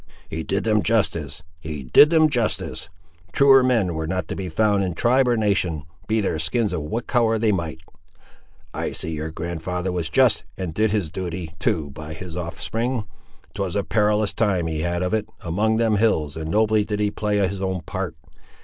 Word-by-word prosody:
"He 80 - -3
did 100 +5 -1
them 110 -1 +2
justice! 85 -9 0 0.2
he 75 -3 -6
did 105 - +7
them 160 -1 +5
justice! 120 - -2 0.4
Truer 135 -1 +7
men 115 -9 +2
were 80 0 -3
not 95 +2 -2
to - - -3
be 95 -2 -4
found 100 +3 +2
in 90 -3 -2
tribe 125 +7 +3
or 120 -1 +2
nation, 95 -8 0 0.2
be 110 +1 +1
their 90 -5 -1
skins 100 +7 0
of 80 - -2
what 95 +11 -3
colour 115 -3 +2
they 110 0 +2
might. 85 -4 -2 0.9
I - - -3
see 80 - -3
your 80 0 -3
grand'ther 85 +3 -3
was 85 -2 -2
just, 125 -2 +3
and 90 -4 -4
did 110 +5 +2
his 100 -7 -1
duty, 85 -2 -5
too, 75 -3 0
by 80 +2 -8
his 85 0 -8
offspring! 115 +8 -2 0.5
'Twas 95 -3 -3
a 100 - +1
perilous 105 0 +1
time 100 -6 +1
he 80 -2 -2
had 85 +2 -1
of 90 - -1
it, 110 -1 -1
among 105 +6 +1
them 110 -2 +2
hills, 80 -9 +1
and 80 -1 -5
nobly 110 +2 +3
did 105 0 -3
he 105 -1 +1
play 105 -1 -1
his 95 -1 0
own 95 -2 -1
part! 95 -1 -4
95 Hz, 195 wpm, -23 LUFS, 80-110 Hz, 0.9 s, did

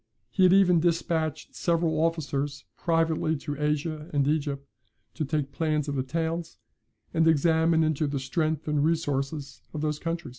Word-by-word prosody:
He 190 - -1
had 185 -1 +7
even 185 -3 +5
dispatched 160 -2 -1
several 165 -2 +1
officers 145 -4 -2
privately 165 -1 +1
into 145 -1 -4
Asia 150 +1 -1
and 140 -2 +1
Egypt, 140 -2 -1 0.5
to 160 - -3
take 145 -1 -1
plans 155 0 0
of 145 - -2
the 135 - 0
towns, 165 +4 -3 0.6
and 165 0 +3
examine 160 +1 +4
into 155 -1 +1
the 140 -1 -2
strength 155 +3 -1
and 150 -1 +1
resources 145 -3 -1
of 150 - -3
those 150 -1 -1
countries." 165 -2 -3
155 Hz, 155 wpm, -27 LUFS, 145-165 Hz, 0.6 s, had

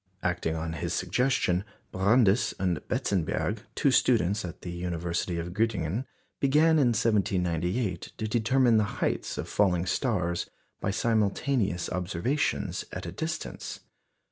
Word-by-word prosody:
Acting 90 -3 0
on 80 0 -3
his 85 - -2
suggestion, 120 -8 +1 0.3
Brandes 100 +3 +3
and 90 -4 0
Benzenberg, 100 +3 0 0.2
two 140 - +3
students 110 -6 +3
at 85 -2 -8
the 90 - -5
University 85 0 -2
of 85 +1 -4
Göttingen, 105 0 0 0.3
began 155 +3 +4
in 135 - +4
1798 95 -2 0
to 110 - -2
determine 120 +2 +3
the 110 - +4
heights - - -1
of - - -4
falling 90 -4 +2
stars 90 -6 0 0.3
by - - -1
simultaneous 105 -2 +1
observations 90 - -1
at - - -6
a 85 - -4
distance. 160 - -5
100 Hz, 125 wpm, -28 LUFS, 90-115 Hz, 0.3 s, began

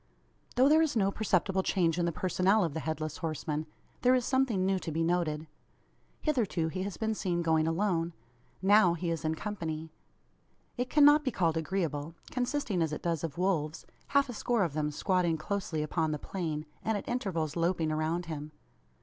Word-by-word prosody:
Though 255 +2 +5
there 310 +2 +6
is 315 -5 +1
no 195 -3 +2
perceptible 195 -2 +1
change 175 -3 +1
in 175 - +2
the 170 - +1
personnel 185 +5 +2
of 165 -4 -1
the 160 - -2
Headless 155 -1 -3
Horseman 155 -2 -3 0.3
there 250 +1 +5
is 250 -2 +1
something 260 -8 +2
new 190 0 +2
to 165 - -5
be 165 +2 0
noted. 165 -3 0 0.8
Hitherto 220 - +1
he 185 +3 -4
has 195 0 -4
been 220 0 0
seen 175 -4 -1
going 160 -1 +2
alone. 170 -1 0 0.5
Now 195 -3 +6
he 170 0 -2
is 165 -3 -3
in 160 0 0
company. 160 -5 -4 0.8
It 245 +1 -2
cannot 295 0 +6
be 270 - +1
called 170 -8 +1
agreeable; 160 -2 -2 0.2
consisting 250 - -1
as 160 -2 +1
it 150 - -5
does 165 -3 -1
of 160 -2 -4
wolves 165 -5 0 0.2
half 280 0 +3
a 245 - -6
score 230 -1 +1
of 165 -5 -1
them 150 0 0
squatting 175 +1 +1
closely 160 -2 -2
upon 160 +1 0
the - - -1
plain, 155 -2 -4 0.2
and 220 -1 0
at 200 - -7
intervals 180 - -2
loping 170 -2 +1
around 160 +3 -1
him. 155 -2 -6
175 Hz, 185 wpm, -30 LUFS, 160-205 Hz, 0.8 s, there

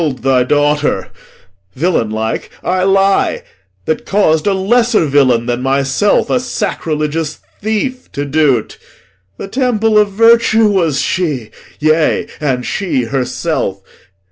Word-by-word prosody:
I - - +1
am 145 -4 -1
Posthumus, 125 - -18
That 135 - +2
kill'd - - +3
thy 125 - +4
daughter; 145 -6 +1 0.7
villain 155 -7 0
like, 110 +1 -3
I 185 +1 0
lie 195 0 +2 0.4
That 160 - -1
caus'd 175 -5 +2
a 200 - +3
lesser 225 0 +2
villain 130 -5 +2
than 120 0 -2
myself, 135 +9 +1
A 255 - +2
sacrilegious 160 - -3 0.2
thief, 235 +5 -3
to 145 - -3
do't. 140 -5 0 0.6
The - - -6
temple 225 -2 +1
Of 210 -1 +2
virtue 225 +1 +4
was 170 -8 +1
she; 150 -12 -2 0.3
yea, 155 +1 +2
and 130 -4 -1
she 175 -10 -1
herself. 125 - -2
155 Hz, 140 wpm, -14 LUFS, 135-205 Hz, 0.7 s, thy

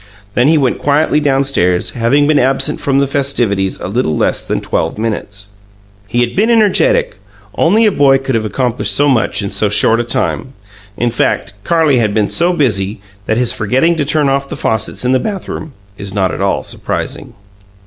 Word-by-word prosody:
Then 120 +4 +2
he 160 +1 +4
went 135 -4 0
quietly 150 +1 +2
downstairs, 135 -11 +1
having 125 +5 +1
been 150 0 +3
absent 135 +2 0
from 135 -1 +1
the 140 - +3
festivities 120 -9 0
a - - -5
little 95 -7 -1
less - - 0
than - - -2
twelve - - -2
minutes. 105 -2 -4 0.6
He 120 +4 0
had 120 0 -1
been 215 +4 +2
energetic 475 - +2 0.3
only 225 +2 +3
a 210 - +4
boy 140 -6 +4
could 135 0 -4
have 115 -2 0
accomplished 120 +3 -1
so 145 - +3
much 120 -5 +1
in 100 - -4
so 105 - +1
short 110 +3 +3
a - - 0
time. 130 +2 -3 0.4
In 120 0 0
fact, - - -1
Carlie 155 -2 +2
had 105 -3 0
been 105 -2 +1
so 170 +1 +2
busy 110 - -1 0.3
that 110 - +1
his 120 -1 +1
forgetting 130 +10 +1
to 150 - +1
turn 150 0 +1
off 140 0 -1
the - - -6
faucets 110 +2 -2
in 125 - +2
the 130 - +3
bathroom 190 -6 -5 0.3
is 100 0 -7
not 95 -2 0
at - - -5
all - - 0
surprising. - - -5
130 Hz, 190 wpm, -14 LUFS, 110-145 Hz, 0.6 s, he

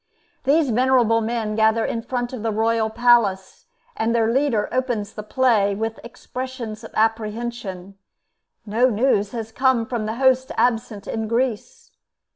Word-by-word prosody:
These 285 -1 +3
venerable 240 -1 +3
men 225 -1 -2
gather 220 +1 +2
in 230 - -2
front 245 +1 -3
of 250 - -5
the 225 0 -1
royal 225 +1 +1
palace, 235 - +2 0.3
and 230 +1 0
their 225 -1 +2
leader 265 -6 +1
opens 240 -5 -2
the 210 - -6
play 210 -3 +2
with 225 +2 -3
expressions 240 -2 -7
of 225 - -8
apprehension: 215 -3 -2 0.7
no 230 +5 +2
news 210 -3 +1
has 225 -2 -5
come 255 -1 +2
from 225 -2 -3
the 220 - -3
host 260 +2 +2
absent 225 -4 0
in 220 -1 -3
Greece. 255 - -2
230 Hz, 145 wpm, -22 LUFS, 215-250 Hz, 0.7 s, These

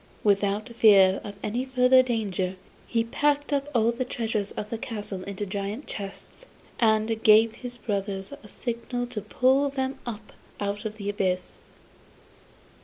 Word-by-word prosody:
Without 205 +2 +2
fear 200 -5 +5
of 205 - -7
any 235 +4 -1
further 260 0 +5
danger, 200 -7 -1 0.3
he 230 -1 +1
packed 290 +5 0
up 280 0 0
all 230 0 +4
the 240 +2 -2
treasures 225 -4 -2
of 210 - -6
the 230 - -2
castle 210 -5 -5
into 200 +1 -4
great 200 +6 -4
chests, 200 - -7 0.3
and 220 0 +2
gave 220 +1 +6
his 245 0 -8
brothers 200 -1 -3
a 210 - -13
signal 240 +3 -4
to 235 -3 -5
pull 265 +6 +2
them 265 0 -3
up 220 -2 -7 0.3
out 205 +1 -3
of 215 0 -4
the 200 -2 -6
abyss. 185 -3 -2
220 Hz, 150 wpm, -26 LUFS, 200-245 Hz, 0.3 s, gave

